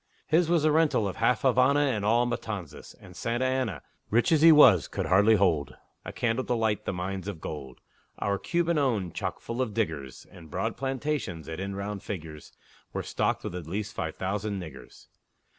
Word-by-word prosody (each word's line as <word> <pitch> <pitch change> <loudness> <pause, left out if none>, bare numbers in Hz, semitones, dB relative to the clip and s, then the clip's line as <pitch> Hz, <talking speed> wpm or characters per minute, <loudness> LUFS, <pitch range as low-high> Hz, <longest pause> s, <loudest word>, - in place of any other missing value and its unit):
His 165 +1 +2
was 170 -3 +3
the 155 - +4
rental 150 -9 +2
of 95 - -5
half 125 - +2
Havana 130 +2 +4
And 125 -8 0
all 115 +3 +3
Matanzas; 100 -10 -5
and 90 - -14
Santa 120 +5 -1
Anna, 130 - -1 0.3
Rich 120 +8 +2
as 155 -2 +4
he 165 0 +9
was, 125 - +7
could - - -3
hardly 100 +4 +5
hold 85 -8 +1 0.3
A - - -6
candle 120 +2 -1
to 125 - 0
light 110 -2 0
the - - -1
mines 95 +1 -4
of 100 -6 -5
gold 70 -5 -7 0.4
Our 100 -1 -1
Cuban 170 - 0
owned, 110 - 0
choke - - -4
full 120 +2 -4
of 110 -5 -2
diggers; 70 - -3
And 80 -3 -13
broad - - -2
plantations, 135 - -3
that, 80 +1 -6
in 95 +1 -4
round 100 0 -4
figures, 80 -6 -7 0.4
Were - - -3
stocked - - -1
with - - -5
at 90 -3 -6
least 105 +4 -4
five 80 - -4
thousand 100 +1 -3
niggers! 80 -7 -11
105 Hz, 190 wpm, -28 LUFS, 90-130 Hz, 0.4 s, he